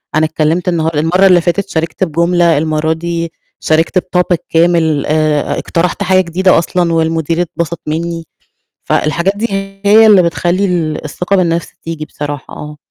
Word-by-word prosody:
أنا 155 0 +3
اتكلّمت 160 +3 -1
النهار 165 -1 -1
المَرّة 180 +5 +3
اللي 180 -2 +5
فاتت 190 +3 -1
شاركت 165 +2 -2
بجملة، 170 0 +2
المرّة 155 +1 0
دي 170 0 -4 0.3
شاركت 160 +4 +1
بTopic 180 -1 0
كامل، 165 -3 +2
آآ 155 -1 0
اقترحت 180 +4 -1
حاجة 185 0 +3
جديدة 185 +2 +2
أصلًا 170 0 -1
والمدير 165 +1 0
اتبسط 170 -1 -4
منّي، 165 +1 -3 0.6
فالحاجات 170 +5 0
دي 230 +2 -1 0.4
هي 220 +2 +6
اللي 195 -4 +6
بتخلّي 175 +3 0
ال 160 -4 -2
الثقة 180 +6 -2
بالنَفْس 170 -2 -1
تيجي 160 -2 -5
بصراحة، 145 -2 -6
آه. 150 0 -9
170 Hz, 150 wpm, -13 LUFS, 160-180 Hz, 0.6 s, هي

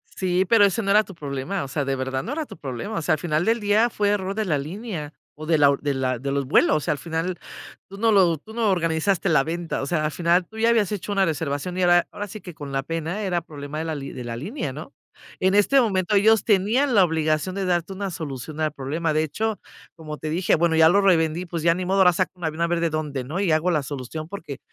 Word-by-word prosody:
Sí, 185 0 +1
pero 215 +1 +5
ese 200 +3 +1
no 200 - -3
era 210 +2 +5
tu 195 - -12
problema, 145 +4 -4
o 140 - -6
sea, 145 +1 -2
de 135 0 -1
verdad 130 0 -3
no 255 - -5
era 310 +1 -2
tu - - -12
problema, 145 - -5
o 165 - -1
sea, 155 +2 +1
al 155 - 0
final 155 +1 0
del 230 +1 +2
día 210 +3 +3
fue 205 -3 0
error 195 -2 -1
de 220 0 -1
la 155 -6 +1
línea 160 0 -6 0.2
o 155 - -8
de 160 -1 +2
la 140 -1 +5
de 145 -1 0
la 130 -2 -1
de 135 +3 -4
los 140 -1 -1
vuelos, 155 +2 +4
o - - -1
sea, 150 - -1
al - - -6
final 165 +4 -3 0.5
tú 195 - -10
no 225 +2 +2
lo 180 -5 +4
tú 215 +9 -14
no 225 -2 +1
organizaste 175 +2 +1
la 150 -4 +4
venta, 170 +2 -3
o 135 - -3
sea, 155 0 0
al 155 - 0
final 175 +2 +2
tú 220 - -13
ya 230 +1 +3
habías 215 -3 +2
hecho 205 +1 -4
una 195 -1 +3
reservación 160 +2 -2
y - - +1
era 175 -1 +4
ahora 205 - -5
sí 215 - -8
que 180 - -9
con 145 -3 -8
la 135 0 0
pena, 165 +6 -3
era 180 -3 0
problema 150 -2 -8
de 160 - -2
la 160 - -2
de 135 -3 -7
la 115 -1 -5
línea, 195 - -4
¿no?, - - -9 0.5
en 190 +1 +2
este 270 +7 +5
momento 195 -3 0
ellos 215 +2 +4
tenían 230 +7 +2
la 200 - +6
obligación 160 +2 0
de 195 - -1
darte 175 0 0
una 195 +1 -4
solución 150 -1 -6
al 155 -1 +1
problema, 155 +4 -2
de 155 +1 +1
hecho, 220 +7 -2 0.4
como 155 -2 -7
te 155 +2 -5
dije, 175 +3 +1
bueno, 165 0 +2
ya 160 0 +7
lo 200 +4 +4
revendí, 170 -3 +2
pues 170 -2 -5
ya 170 0 +5
ni 185 - -3
modo, 190 +2 0
ahora 180 -2 +6
saca 185 +2 0
un 175 - -9
avión 160 +1 -2
a 170 - +2
ver 175 - 0
de 170 -1 0
dónde, 150 -4 -3
¿no?, 160 +9 -4
y 195 -4 +1
hago 155 +3 +2
la 155 -3 +1
solución 145 +3 -6
porque 160 -8 -7
170 Hz, 270 wpm, -23 LUFS, 150-195 Hz, 0.5 s, ya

